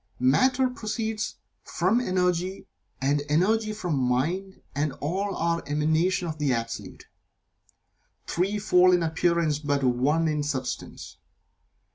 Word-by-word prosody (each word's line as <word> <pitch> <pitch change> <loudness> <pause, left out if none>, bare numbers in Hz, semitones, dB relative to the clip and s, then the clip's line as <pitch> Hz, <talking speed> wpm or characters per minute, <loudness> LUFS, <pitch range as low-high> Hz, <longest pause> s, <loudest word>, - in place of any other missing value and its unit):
Matter 250 - +3
proceeds 220 -3 -3 0.3
from 195 +8 +1
Energy, 185 -2 0 0.3
and 140 +2 +1
Energy 215 +8 +2
from 180 -9 -2
Mind, 160 +11 -1
and 145 0 -1
all 190 +9 -2
are 170 0 0
an - - -10
emanation 160 +4 +1
of 155 -1 -5
the 145 -3 +1
Absolute, 115 -1 -5 1.2
threefold 185 -1 +3
in 175 - 0
appearance 165 -2 +1
but 145 -2 -1
One 135 +6 +2
in 150 -1 0
substance. 135 -3 -5
170 Hz, 115 wpm, -26 LUFS, 145-195 Hz, 1.2 s, Matter